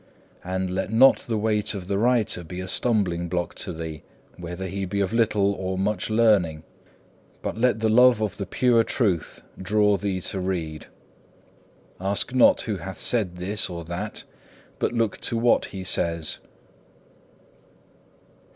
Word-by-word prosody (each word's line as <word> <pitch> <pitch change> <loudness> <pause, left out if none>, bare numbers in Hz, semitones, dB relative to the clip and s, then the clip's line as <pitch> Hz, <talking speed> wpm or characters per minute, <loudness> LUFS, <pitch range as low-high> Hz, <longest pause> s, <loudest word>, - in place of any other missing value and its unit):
And 95 0 -2
let 95 +2 -2
not 130 +4 +6
the 115 -5 -3
weight 105 0 0
of 95 -3 -6
the 100 0 0
writer 115 -6 +1
be 90 +2 -7
a 95 - -5
stumbling 90 -6 0
block 85 0 -2
to 95 - -5
thee, 80 -2 -6 0.3
whether 90 +2 -6
he 95 +1 -4
be 95 +2 -2
of 100 +2 0
little 105 -3 +2
or 95 -1 -3
much 100 +1 -1
learning, 105 -9 +3 0.8
but - - -3
let 115 -1 +1
the 110 - +2
love 125 +1 +6
of 105 -2 -2
the 100 - -4
pure 120 -2 +3
Truth 100 - -1 0.2
draw 105 +1 +2
thee 95 -2 -2
to 95 - -4
read. 85 -5 -3 1.1
Ask 100 +6 -1
not, 130 - +5
who 105 -4 -3
hath 95 +2 -7
said 105 -7 0
this 95 +3 -1
or 85 -1 -6
that, 90 +6 -5 0.6
but - - 0
look 115 -3 -1
to 115 - -1
what 120 +1 +3
he 95 -1 -7
says. 85 -3 -1
100 Hz, 155 wpm, -24 LUFS, 90-110 Hz, 1.1 s, not